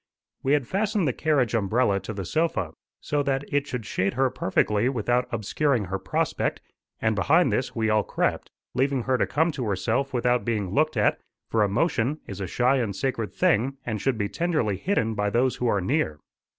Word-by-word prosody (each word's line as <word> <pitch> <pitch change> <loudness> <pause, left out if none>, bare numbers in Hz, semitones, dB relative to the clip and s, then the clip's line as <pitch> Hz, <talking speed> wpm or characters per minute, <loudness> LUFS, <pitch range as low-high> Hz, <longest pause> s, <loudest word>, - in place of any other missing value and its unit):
We 135 - +1
had 145 -4 +2
fastened 200 -2 0
the 130 - +1
carriage 140 -7 +1
umbrella 110 -1 +2
to 95 +3 -7
the 100 -3 -5
sofa, 110 - 0 0.3
so 145 -1 0
that 135 -1 0
it 145 0 +1
should 125 -5 -4
shade 100 +2 -1
her 130 0 +2
perfectly 105 +4 +1
without 125 0 0
obscuring 115 +2 0
her 95 +2 -3
prospect; - - -1 0.4
and 110 0 +1
behind 160 - +3
this 130 - -1
we 110 -1 +1
all 110 0 +4
crept, - - -1 0.2
leaving 130 0 +1
her 130 +1 +1
to - - +2
come 160 +3 +1
to 130 -5 -4
herself 110 +7 0
without 125 0 +1
being 105 -6 -1
looked 155 +3 +1
at, 105 - +2 0.3
for 110 - +2
emotion 120 - +1
is 100 -1 -7
a 95 - -2
shy 125 +8 +2
and 110 -6 -1
sacred 115 -1 -2
thing 130 +6 +1
and 110 -3 -3
should 135 -4 +1
be 105 -2 0
tenderly 155 - 0
hidden 115 - 0
by 105 -1 0
those 125 +4 +1
who 125 - -1
are 105 - +2
near. 95 - 0
120 Hz, 195 wpm, -25 LUFS, 105-140 Hz, 0.4 s, all